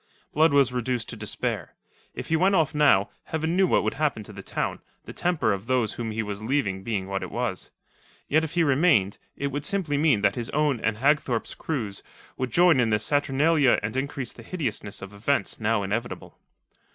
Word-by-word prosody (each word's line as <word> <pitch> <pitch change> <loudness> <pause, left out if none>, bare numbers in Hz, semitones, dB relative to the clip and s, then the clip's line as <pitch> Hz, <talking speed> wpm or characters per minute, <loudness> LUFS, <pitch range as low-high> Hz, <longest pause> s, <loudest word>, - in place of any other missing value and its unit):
Blood 155 +1 +4
was 140 -3 +4
reduced 125 -1 -2
to - - -6
despair. - - -4 0.4
If - - -6
he 160 - +3
went 190 +4 +3
off 160 -4 +2
now, 140 -10 +4
Heaven 160 +2 -2
knew 190 0 +4
what - - +2
would - - 0
happen 145 -7 -1
to 105 - -12
the 100 - -8
town, - - -3 0.3
the - - -8
temper 155 - +1
of 100 +3 -6
those 125 -4 +1
whom 115 -2 -4
he 110 +1 -2
was 105 -1 -5
leaving 110 -6 -1
being 95 -3 -3
what 95 0 -2
it - - -5
was. - - -3 0.6
Yet 155 +2 +3
if 160 - -4
he 170 - +4
remained, 140 - +3 0.2
it 140 0 -2
would 145 +2 -3
simply 155 -5 -1
mean 145 -9 +3
that 100 -1 +3
his 120 0 -4
own 150 -4 +1
and 110 -1 -1
Hagthorpe's 135 -2 +1
crews 110 -11 -4 0.3
would 130 -1 -2
join 170 +1 +4
in 115 -2 +3
the 105 - +3
saturnalia 145 +3 +2
and 110 +2 -3
increase 135 -2 -3
the - - -12
hideousness 115 - -4
of 100 +1 -9
events 115 +8 -1
now 110 -1 +1
inevitable. 110 +5 -4
130 Hz, 200 wpm, -25 LUFS, 110-150 Hz, 0.6 s, Blood